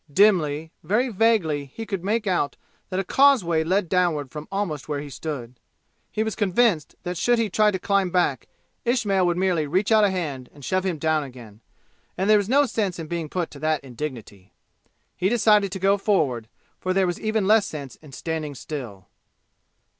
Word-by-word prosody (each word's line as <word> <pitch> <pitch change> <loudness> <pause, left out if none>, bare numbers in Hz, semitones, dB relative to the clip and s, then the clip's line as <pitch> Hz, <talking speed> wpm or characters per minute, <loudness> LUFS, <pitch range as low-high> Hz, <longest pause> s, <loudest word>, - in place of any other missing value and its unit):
Dimly, 160 -5 +3
very 215 +10 +1
vaguely 185 - +1
be 225 - -4
could 195 -5 -4
make 215 +3 0
out 175 -7 0 0.3
that 185 0 -2
a - - 0
causeway 190 - +4
led 185 +3 +1
downward 160 -6 +1
from 150 0 -7
almost 175 -8 -3
where 145 -1 -1
he 145 0 -7
stood. 130 -4 -6 0.5
He 215 - 0
was 220 -1 -2
convinced 205 -5 +1
that 180 0 -4
should 240 0 +3
he 225 -3 0
try 215 +2 +4
to 195 - -1
climb 195 0 +1
back 175 -8 0 0.4
Ismail 210 -6 +1
would 175 0 0
merely 180 -5 +1
reach 190 +8 0
out 220 -1 +6
a 205 - +5
hand 150 -9 -4
and 145 -3 -11
shove 185 0 0
him 175 -4 -1
down 155 0 +1
again, 120 -5 -12 0.6
and 190 +2 0
there 215 0 +6
was 205 +1 -3
no 285 +3 +5
sense 210 -7 -2
in 165 - -5
being 165 -1 -4
put 175 -1 -3
to 140 - -11
that 155 -1 0
indignity. 120 -7 -8 0.6
He 185 - +1
decided 210 -4 +3
to 195 - -3
go 195 +2 +3
forward, 135 - +1 0.3
for 185 - -1
there 195 -1 +3
was 175 -1 -2
even 215 -2 0
less 210 0 +4
sense 140 -5 -7
in 150 -3 -15
standing 155 0 -4
still. 120 -11 -7
180 Hz, 190 wpm, -24 LUFS, 150-205 Hz, 0.6 s, out